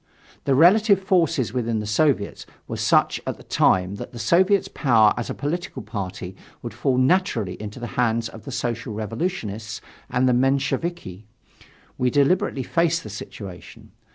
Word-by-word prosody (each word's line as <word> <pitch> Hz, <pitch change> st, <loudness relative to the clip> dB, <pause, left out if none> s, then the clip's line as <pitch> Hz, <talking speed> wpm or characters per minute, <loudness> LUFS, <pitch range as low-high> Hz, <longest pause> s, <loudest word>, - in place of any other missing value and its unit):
The 135 Hz, -, +3 dB
relative 200 Hz, -, +5 dB
forces 165 Hz, -, +1 dB
within 115 Hz, -3 st, -1 dB
the 105 Hz, -, -4 dB
Soviets 110 Hz, -1 st, 0 dB, 0.2 s
were -, -, -4 dB
such -, -, +2 dB
at -, -, -3 dB
the -, -, -14 dB
time 95 Hz, +2 st, +2 dB
that 120 Hz, -, -8 dB
the -, -, -8 dB
Soviet's 185 Hz, -, +3 dB
power 115 Hz, -7 st, +3 dB
as 120 Hz, -, -4 dB
a -, -, -3 dB
political 165 Hz, +5 st, -4 dB
party 95 Hz, -3 st, -6 dB, 0.3 s
would -, -, -6 dB
fall 130 Hz, -2 st, 0 dB
naturally 130 Hz, -, +2 dB
into 105 Hz, +3 st, -7 dB
the 120 Hz, -, -5 dB, 0.2 s
hands 115 Hz, -1 st, +1 dB
of 110 Hz, -1 st, -12 dB
the -, -, -6 dB
Social 115 Hz, -2 st, -3 dB
Revolutionists 110 Hz, -, -4 dB, 0.3 s
and 125 Hz, +1 st, +2 dB
the 125 Hz, -, +4 dB
Mensheviki. 135 Hz, -, -1 dB, 0.7 s
We 125 Hz, -, +2 dB
deliberately 140 Hz, -1 st, +2 dB
faced 165 Hz, +3 st, +1 dB
the 110 Hz, -, -8 dB
situation. 100 Hz, -2 st, -10 dB
125 Hz, 155 wpm, -23 LUFS, 110-165 Hz, 0.7 s, relative